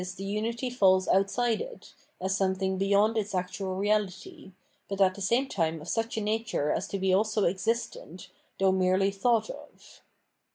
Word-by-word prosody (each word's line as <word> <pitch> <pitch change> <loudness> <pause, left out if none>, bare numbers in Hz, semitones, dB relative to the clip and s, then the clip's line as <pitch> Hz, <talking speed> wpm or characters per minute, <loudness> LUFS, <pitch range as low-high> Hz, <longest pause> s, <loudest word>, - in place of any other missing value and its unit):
the 195 +2 -5
xmity 235 +4 -2
falls 190 -5 +4
outside 220 +4 +2
it, - - -9 0.3
as 190 +1 -1
something 190 0 0
beyond 200 +3 +3
its 210 -3 -2
actual 185 +1 -3
reality, 205 - -2 0.4
but 195 0 -4
at 190 -1 +4
the 200 - -10
same 235 +8 +1
time 165 -7 -1
of 150 - -11
such 225 +2 -2
a - - 0
nature 215 -8 -1
as 180 - -2
to 200 - -3
be 190 -1 +1
also 215 +1 +2
existent, 190 -2 -3 0.3
though 190 0 +3
merely 190 +1 +2
thought 230 - +1
of. - - -14
195 Hz, 165 wpm, -28 LUFS, 185-220 Hz, 0.4 s, falls